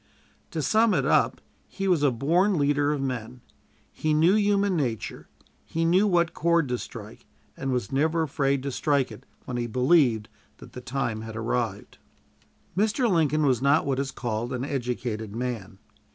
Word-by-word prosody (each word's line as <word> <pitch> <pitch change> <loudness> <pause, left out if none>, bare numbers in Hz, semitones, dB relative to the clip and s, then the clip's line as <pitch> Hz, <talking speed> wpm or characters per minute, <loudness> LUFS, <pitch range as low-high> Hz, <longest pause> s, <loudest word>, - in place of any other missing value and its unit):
To 155 - -3
sum 220 +4 +3
it - - +1
up, - - +2 0.3
he 195 0 -4
was 175 -5 +3
a 145 - +4
born 170 - +2
leader 145 0 +2
of 150 - -1
men. 125 -2 -4 0.5
He 155 -1 -1
knew 165 +5 +4
human 200 -2 +2
nature; 125 -9 -3 0.4
he 165 +1 -2
knew 185 +5 +4
what 170 -3 +2
chord 170 -1 +2
to 125 -1 -1
strike, - - -10 0.3
and 135 - -3
was 125 -6 -2
never 160 +4 +1
afraid 140 -2 0
to 140 - -3
strike 140 -2 0
it 110 - -12 0.2
when 125 - -4
he 120 -1 -2
believed 125 -2 +3 0.3
that - - -14
the 125 - -8
time 125 -4 -3
had 110 0 -8
arrived. - - -3 0.8
Mr. 220 +6 +2
Lincoln 155 -5 +2
was 130 -4 +2
not 140 +3 +3
what 135 -1 0
is 140 -1 -1
called 120 -1 -3
an 125 +1 -2
educated 120 -5 -3
man. 115 -6 -4
140 Hz, 170 wpm, -26 LUFS, 125-165 Hz, 0.8 s, a